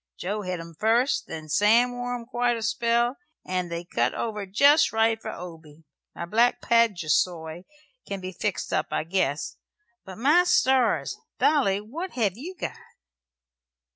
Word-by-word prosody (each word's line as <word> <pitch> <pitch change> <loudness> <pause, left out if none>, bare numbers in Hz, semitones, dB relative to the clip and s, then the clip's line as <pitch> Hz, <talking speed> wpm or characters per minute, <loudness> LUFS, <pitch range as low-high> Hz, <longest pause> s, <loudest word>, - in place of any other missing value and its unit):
Joe 205 +4 -3
hed 185 -3 -4
'em 165 0 -9
first, 230 - +1
then 155 -1 -7
Sam 220 +9 +4
wore 245 0 -4
'em 235 -1 -7
quite 240 0 0
a 225 - -5
spell, 235 +2 +1 0.3
and 180 -1 -2
they 170 0 -4
cut - - 0
over 210 -3 -3
jest 280 +10 +5
right 225 0 +2
for - - -6
Obey. 165 -5 -10 0.3
My 170 - -5
black 230 +7 +2
paduasoy 175 -6 +1 0.4
can 200 -1 -4
be 185 0 -6
fixed 190 +2 -3
up, - - 0
I - - -1
guess. 165 -3 -1 0.5
But, 190 -1 -10
my 300 +10 +4
stars! 260 -7 +2 0.2
Dolly, 230 -10 +2
what 320 - -7
hev' 210 -7 0
you 335 - -8
got?" - - -5
215 Hz, 155 wpm, -25 LUFS, 180-240 Hz, 0.5 s, jest